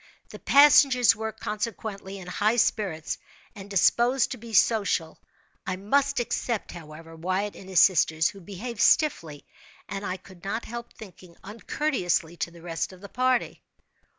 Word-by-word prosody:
The -, -, -10 dB
passengers 275 Hz, -4 st, +6 dB
were, 220 Hz, +1 st, -4 dB
consequently, 210 Hz, -3 st, -5 dB
in 190 Hz, -, -10 dB
high 205 Hz, +5 st, 0 dB
spirits 195 Hz, -9 st, -1 dB, 0.3 s
and 200 Hz, -3 st, -11 dB
disposed 240 Hz, +6 st, +2 dB
to 255 Hz, -, -4 dB
be 230 Hz, 0 st, -11 dB
social. 200 Hz, -8 st, +1 dB, 0.5 s
I 185 Hz, -, -1 dB
must 275 Hz, +8 st, +1 dB
except, 235 Hz, -2 st, -2 dB
however, 165 Hz, -1 st, -11 dB
Wyatt 185 Hz, +5 st, -2 dB
and 190 Hz, -, -12 dB
his 185 Hz, -, +5 dB
sisters, 160 Hz, -3 st, +3 dB
who 195 Hz, -, -12 dB
behaved 210 Hz, +5 st, -6 dB
stiffly, 165 Hz, -, +2 dB, 0.4 s
and, 195 Hz, 0 st, -5 dB
I 185 Hz, -1 st, -3 dB
could 185 Hz, -2 st, -17 dB
not 200 Hz, +4 st, -3 dB
help 235 Hz, 0 st, -8 dB
thinking, 180 Hz, -4 st, -14 dB
uncourteously 205 Hz, -, -2 dB
to -, -, -3 dB
the 170 Hz, -1 st, -16 dB
rest 165 Hz, +1 st, -3 dB
of 185 Hz, -1 st, -15 dB
the 200 Hz, -, -10 dB
party. 255 Hz, +1 st, 0 dB
200 Hz, 150 wpm, -26 LUFS, 180-235 Hz, 0.5 s, passengers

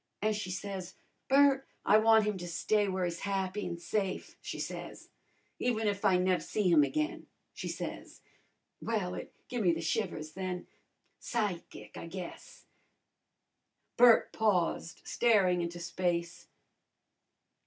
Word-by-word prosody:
An' 215 Hz, +1 st, +1 dB
she 210 Hz, -3 st, -4 dB
says, 190 Hz, -1 st, -5 dB, 0.3 s
'Bert, 275 Hz, 0 st, +5 dB, 0.2 s
I 210 Hz, -, +6 dB
wan' 220 Hz, 0 st, +6 dB
him 210 Hz, -1 st, 0 dB
to 175 Hz, -, -6 dB
stay 205 Hz, +5 st, +1 dB
w'ere 190 Hz, -2 st, -1 dB
he's 170 Hz, -1 st, -3 dB
happy 195 Hz, 0 st, -2 dB
an' 170 Hz, -1 st, -4 dB
safe,' 185 Hz, +3 st, -2 dB
she -, -, -5 dB
says. -, -, -6 dB, 0.5 s
'Even 225 Hz, -3 st, 0 dB
if 200 Hz, -1 st, -1 dB
I 185 Hz, -, +5 dB
nev' 185 Hz, 0 st, +2 dB
see 210 Hz, -3 st, -1 dB
him 160 Hz, -3 st, +7 dB
again,' 305 Hz, -, -2 dB, 0.3 s
she -, -, -6 dB
says. -, -, -6 dB, 0.6 s
Well, 205 Hz, -6 st, -1 dB
it -, -, -7 dB, 0.2 s
give 245 Hz, -2 st, -2 dB
me 175 Hz, -4 st, +4 dB
the 165 Hz, -, -3 dB
shivers 155 Hz, -1 st, -2 dB
then. 185 Hz, 0 st, -4 dB, 0.5 s
Psychic, 180 Hz, -, -4 dB
I -, -, -7 dB
guess." 180 Hz, 0 st, -9 dB, 1.3 s
Bert 240 Hz, -1 st, +6 dB
paused, 185 Hz, -6 st, 0 dB
staring 195 Hz, -7 st, +3 dB
into 170 Hz, 0 st, -4 dB
space. 170 Hz, 0 st, -2 dB
190 Hz, 135 wpm, -31 LUFS, 175-215 Hz, 1.3 s, him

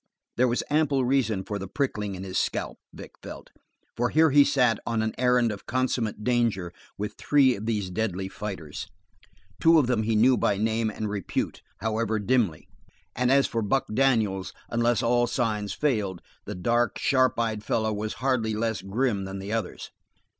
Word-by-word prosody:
There 125 Hz, +1 st, +3 dB
was 120 Hz, 0 st, 0 dB
ample 145 Hz, -4 st, +2 dB
reason 120 Hz, -7 st, +1 dB
for 100 Hz, +1 st, -4 dB
the 95 Hz, -, -6 dB
prickling 105 Hz, -5 st, -2 dB
in 95 Hz, -, -7 dB
his 95 Hz, -1 st, -1 dB
scalp, -, -, -2 dB
Vic -, -, -11 dB
felt, -, -, -10 dB, 0.4 s
for 120 Hz, +1 st, 0 dB
here 160 Hz, 0 st, +4 dB
he 145 Hz, +1 st, +7 dB
sat 125 Hz, -6 st, +2 dB
on 115 Hz, -1 st, -1 dB
an 110 Hz, -, -2 dB
errand 125 Hz, -2 st, +3 dB
of 100 Hz, -, -9 dB
consummate 120 Hz, -4 st, -1 dB
danger 115 Hz, -8 st, 0 dB, 0.2 s
with 105 Hz, +1 st, -4 dB
three 135 Hz, -4 st, +4 dB
of 105 Hz, +3 st, -7 dB
these 105 Hz, -5 st, -1 dB
deadly 95 Hz, -1 st, -2 dB
fighters. 95 Hz, -7 st, -6 dB, 0.7 s
Two 165 Hz, 0 st, +6 dB
of 150 Hz, -, +4 dB
them 120 Hz, -3 st, +1 dB
he 110 Hz, 0 st, 0 dB
knew 125 Hz, +4 st, +5 dB
by 100 Hz, -, +1 dB
name 110 Hz, +1 st, 0 dB
and 110 Hz, 0 st, -4 dB
repute, 100 Hz, -3 st, -3 dB, 0.2 s
however 110 Hz, 0 st, 0 dB
dimly, 105 Hz, -7 st, 0 dB, 0.5 s
and 125 Hz, 0 st, +1 dB
as 140 Hz, 0 st, +5 dB
for 115 Hz, -, -2 dB
Buck 135 Hz, +6 st, +1 dB
Daniels, 110 Hz, -7 st, +1 dB, 0.2 s
unless 120 Hz, +1 st, +1 dB
all 120 Hz, +1 st, +3 dB
signs 105 Hz, -3 st, -1 dB
failed 105 Hz, -, -1 dB, 0.2 s
the 105 Hz, -, -5 dB
dark, 120 Hz, +6 st, +1 dB
sharp 130 Hz, -3 st, +2 dB
eyed 110 Hz, -2 st, -1 dB
fellow 110 Hz, 0 st, 0 dB
was 105 Hz, +1 st, -3 dB
hardly 125 Hz, -5 st, 0 dB
less 110 Hz, 0 st, -1 dB
grim 100 Hz, 0 st, -1 dB
than 95 Hz, 0 st, -6 dB
the 100 Hz, +2 st, -5 dB
others. 115 Hz, -1 st, -4 dB
115 Hz, 175 wpm, -26 LUFS, 105-125 Hz, 0.7 s, he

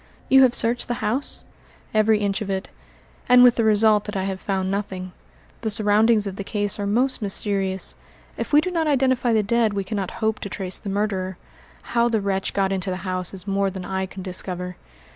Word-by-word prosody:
"You 265 Hz, 0 st, +7 dB
have 255 Hz, -2 st, +5 dB
searched 235 Hz, +1 st, 0 dB
the 240 Hz, -, -1 dB
house?" 255 Hz, +7 st, -2 dB, 0.5 s
"Every 215 Hz, 0 st, +4 dB
inch 200 Hz, 0 st, -1 dB
of 205 Hz, -, -4 dB
it, 190 Hz, 0 st, -3 dB, 0.6 s
and 250 Hz, 0 st, +8 dB
with 245 Hz, -1 st, +7 dB
the 230 Hz, -, +1 dB
result 215 Hz, -1 st, +4 dB
that 210 Hz, -, -6 dB
I 190 Hz, -, -1 dB
have 190 Hz, -1 st, -3 dB
found 190 Hz, -1 st, -2 dB
nothing. 190 Hz, -2 st, -4 dB, 0.5 s
The 225 Hz, -, -1 dB
surroundings 215 Hz, 0 st, +3 dB
of 195 Hz, -1 st, -5 dB
the 200 Hz, -, -4 dB
case 205 Hz, 0 st, -2 dB
are 200 Hz, -, -1 dB
most 250 Hz, +5 st, +1 dB
mysterious. 195 Hz, -2 st, -1 dB, 0.4 s
If -, -, -5 dB
we 295 Hz, 0 st, +6 dB
do 365 Hz, -, -3 dB
not 330 Hz, -3 st, 0 dB
identify 260 Hz, -4 st, +2 dB
the 220 Hz, -2 st, +3 dB
dead 225 Hz, 0 st, +2 dB
we 200 Hz, -, -1 dB
cannot 195 Hz, -1 st, -3 dB
hope 220 Hz, -1 st, 0 dB
to 200 Hz, -, -5 dB
trace 185 Hz, -1 st, -4 dB
the 200 Hz, -, -6 dB
murderer. 195 Hz, -2 st, -2 dB, 0.5 s
How 235 Hz, 0 st, +1 dB
the 225 Hz, -2 st, +1 dB
wretch 195 Hz, -1 st, -2 dB
got 195 Hz, -1 st, +1 dB
into 190 Hz, 0 st, -1 dB
the 185 Hz, +1 st, -4 dB
house 185 Hz, -1 st, -1 dB
is 190 Hz, -1 st, -6 dB
more 195 Hz, 0 st, +1 dB
than 190 Hz, -1 st, -7 dB
I 190 Hz, 0 st, -2 dB
can 190 Hz, 0 st, -9 dB
discover." 180 Hz, -1 st, -4 dB
205 Hz, 210 wpm, -23 LUFS, 190-225 Hz, 0.6 s, and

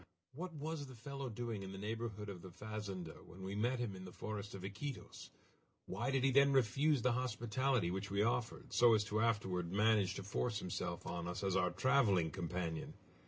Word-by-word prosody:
What 175 Hz, +5 st, -5 dB
was 150 Hz, -1 st, -3 dB
the 130 Hz, -, -10 dB
fellow 135 Hz, +3 st, -5 dB
doing 115 Hz, -2 st, -3 dB
in 95 Hz, 0 st, -6 dB
the 95 Hz, -, -7 dB
neighborhood 105 Hz, 0 st, -3 dB
of 95 Hz, -3 st, -6 dB
the 95 Hz, -, -8 dB
fazenda 100 Hz, -4 st, -5 dB
when 95 Hz, +2 st, -10 dB
we 95 Hz, +1 st, -3 dB
met 120 Hz, +5 st, +1 dB
him 120 Hz, -5 st, -2 dB
in 95 Hz, -, -8 dB
the 90 Hz, -, -8 dB
forest 105 Hz, +1 st, -5 dB
of 95 Hz, -, -7 dB
Iquitos? 120 Hz, +8 st, -6 dB, 0.6 s
Why 115 Hz, +8 st, -2 dB
did 135 Hz, -1 st, +2 dB
he 135 Hz, -, +5 dB
then 140 Hz, +1 st, +6 dB
refuse 135 Hz, +2 st, +3 dB
the 125 Hz, -, +4 dB
hospitality 120 Hz, -3 st, +1 dB
which 95 Hz, +2 st, -3 dB
we 100 Hz, +1 st, +2 dB
offered, 120 Hz, +1 st, -1 dB
so 120 Hz, -2 st, +7 dB
as 105 Hz, -, +3 dB
to 105 Hz, +1 st, 0 dB
afterward 95 Hz, -6 st, +1 dB
manage 105 Hz, -1 st, +3 dB
to 100 Hz, -, -4 dB
force 105 Hz, +3 st, -1 dB
himself 90 Hz, -2 st, -3 dB
on 85 Hz, 0 st, -3 dB
us 90 Hz, +3 st, -3 dB
as 95 Hz, -1 st, +1 dB
our 90 Hz, -1 st, +3 dB
traveling 110 Hz, -, +3 dB
companion? 85 Hz, -2 st, -3 dB
105 Hz, 200 wpm, -38 LUFS, 95-125 Hz, 0.6 s, so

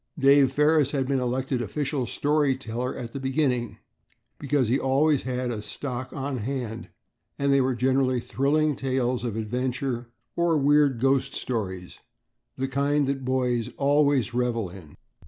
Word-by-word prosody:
Dave 140 Hz, -1 st, +5 dB
Ferris 150 Hz, 0 st, +3 dB
had 135 Hz, -2 st, 0 dB
been 135 Hz, -1 st, +1 dB
elected 130 Hz, +1 st, -1 dB
official 135 Hz, +3 st, -2 dB
story 145 Hz, +1 st, +1 dB
teller 125 Hz, 0 st, -4 dB
at 115 Hz, -1 st, -7 dB
the 140 Hz, -, -4 dB
beginning, 130 Hz, -4 st, 0 dB, 0.6 s
because 140 Hz, -3 st, +1 dB
he 125 Hz, +5 st, +2 dB
always 140 Hz, +2 st, +2 dB
had 125 Hz, -1 st, -2 dB
a 110 Hz, -3 st, -4 dB
stock 125 Hz, +3 st, -5 dB
on 135 Hz, -1 st, -3 dB
hand, 115 Hz, -1 st, -4 dB, 0.5 s
and 140 Hz, 0 st, +2 dB
they 140 Hz, -, +4 dB
were 130 Hz, -1 st, +1 dB
generally 130 Hz, +1 st, +2 dB
thrilling 145 Hz, +4 st, +1 dB
tales 130 Hz, -2 st, -1 dB
of 115 Hz, -4 st, -3 dB
adventure 125 Hz, +2 st, -2 dB, 0.3 s
or 170 Hz, -2 st, +2 dB
weird 145 Hz, -3 st, +3 dB
ghost 135 Hz, +1 st, +1 dB
stories, 95 Hz, -7 st, -4 dB, 0.6 s
the 135 Hz, -, -1 dB
kind 140 Hz, +2 st, +1 dB
that 135 Hz, 0 st, -2 dB
boys 125 Hz, -3 st, 0 dB
always 140 Hz, -4 st, +2 dB
revel 120 Hz, -6 st, -1 dB
in. 90 Hz, -6 st, -13 dB
130 Hz, 150 wpm, -26 LUFS, 120-140 Hz, 0.6 s, Dave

